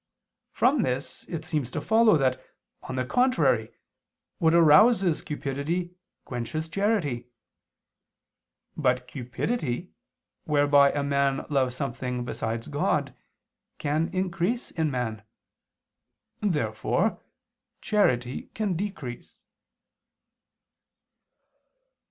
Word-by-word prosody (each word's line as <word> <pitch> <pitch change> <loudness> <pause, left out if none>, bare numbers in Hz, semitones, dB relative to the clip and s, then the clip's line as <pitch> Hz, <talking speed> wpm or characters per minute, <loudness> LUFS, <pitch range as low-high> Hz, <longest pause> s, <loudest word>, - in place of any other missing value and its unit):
From 260 +1 +2
this 130 -3 -3
it 165 -2 -6
seems 150 -7 -2
to - - -3
follow 220 -4 +4
that, 130 -2 0 0.4
on 130 - -6
the 130 -1 -1
contrary, 255 - +2 0.7
what 160 -3 +4
arouses 180 +2 +5
cupidity 150 +4 -3 0.3
quenches 125 +6 -4
charity. 165 - 0 1.5
But 125 -3 +1
cupidity, 130 - -3 0.5
whereby 145 -1 +5
a 145 - -1
man 140 -1 +1
loves 130 -3 +1
something 125 -2 -3
besides 115 -1 -3
God, - - -1 0.6
can 155 +3 0
increase 185 +5 -1
in 160 -2 0
man. 120 -5 -3 1.2
Therefore 145 - 0 0.6
charity 130 - 0
can 210 -4 -1
decrease. 155 - -6
145 Hz, 85 wpm, -26 LUFS, 130-180 Hz, 1.5 s, arouses